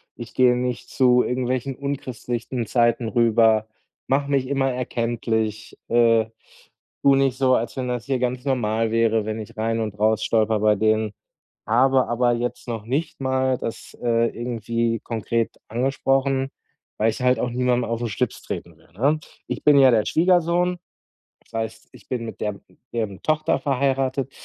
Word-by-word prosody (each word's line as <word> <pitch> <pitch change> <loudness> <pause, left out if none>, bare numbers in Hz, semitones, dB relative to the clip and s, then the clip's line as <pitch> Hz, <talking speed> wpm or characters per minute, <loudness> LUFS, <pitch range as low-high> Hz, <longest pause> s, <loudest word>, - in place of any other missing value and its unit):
Ich 120 -2 -9
gehe 125 -1 +4
nicht 125 -1 -3
zu 125 -2 +4
irgendwelchen 130 +1 -2
unchristlichen 125 -3 -4
Zeiten 120 0 +2
rüber. 115 -2 +3 0.4
Mache 140 +1 +1
mich 135 -2 +1
immer 135 -1 +1
erkenntlich. 115 -3 -2
Äh, 115 -1 +4 0.8
tue 140 -1 +6
nicht 135 -2 +1
so, 130 -2 +4
als 115 +3 -2
wenn 125 -1 -2
das 120 -2 -3
hier 135 -2 -1
ganz 125 0 -1
normal 115 -4 0
wäre, 115 -1 +2
wenn 110 +1 -3
ich 105 - -9
rein 115 +1 0
und 105 -2 -4
raus 110 0 +2
stolpere 110 -1 +2
bei 105 0 +4
denen. 110 0 +1 0.5
Habe 130 +3 +3
aber 120 0 +2
jetzt 120 +1 -3
noch 115 -3 -4
nicht 140 +4 -2
mal 130 -1 +1
das, 115 -2 -7
äh, 115 -1 +2
irgendwie 115 -1 -2
konkret 115 0 -2
angesprochen, 135 +2 0 0.5
weil 110 +1 +2
ich 125 - -7
halt 125 0 +3
auch 125 - 0
niemandem 125 -1 0
auf 115 0 -1
den 120 -2 -2
Schlips 120 +3 -2
treten - - -6
will, - - -25
ne? 140 +10 +1 0.3
Ich - - -4
bin 150 -1 +6
ja 135 -1 +7
der 110 -3 +3
Schwiegersohn, 175 - +2 0.6
das - - -29
heißt, 110 0 -7
ich - - -17
bin 125 -2 -2
mit 110 - -8
der 105 -1 -1
mit 95 -2 -20
deren 105 -4 -3
Tochter 155 0 +1
verheiratet. 135 -1 0
120 Hz, 165 wpm, -23 LUFS, 115-130 Hz, 0.8 s, ja